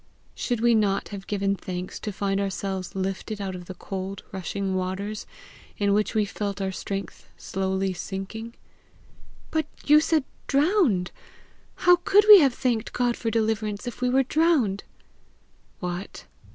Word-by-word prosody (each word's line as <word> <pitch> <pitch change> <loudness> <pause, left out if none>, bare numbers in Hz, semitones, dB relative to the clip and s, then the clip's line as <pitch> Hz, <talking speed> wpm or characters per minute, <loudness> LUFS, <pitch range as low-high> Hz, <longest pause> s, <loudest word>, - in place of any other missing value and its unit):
"Should 240 -3 -2
we 240 0 +5
not 205 -3 +1
have 200 -2 -8
given 200 -1 0
thanks 180 -1 -6
to 210 - -4
find 195 0 -1
ourselves 195 -1 -3
lifted 195 +3 -3
out 195 -2 -3
of 180 -1 -8
the 185 - -8
cold 190 +1 -6
rushing 195 +1 -3
waters, 190 +3 -3 0.5
in 200 -1 +2
which 210 +2 +1
we 215 -1 +3
felt 200 0 -4
our 190 -1 -1
strength 195 +1 -6
slowly 190 0 -1
sinking?" 200 +6 -6 1.0
"But 315 -2 0 0.2
you 300 +1 +7
said 310 -1 +2 0.2
DROWNED! 280 - +2 0.7
How 355 0 +8
could 400 +4 +4
we 420 -2 +12
have 275 -6 +3
thanked 240 -5 -1
God 245 -1 +1
for 230 - -2
deliverance 220 -1 -1
if 245 0 -6
we 250 - +2
were 265 +2 +4
drowned?" 270 - +2 1.0
"What! 180 +1 -5
205 Hz, 150 wpm, -25 LUFS, 195-245 Hz, 1.0 s, we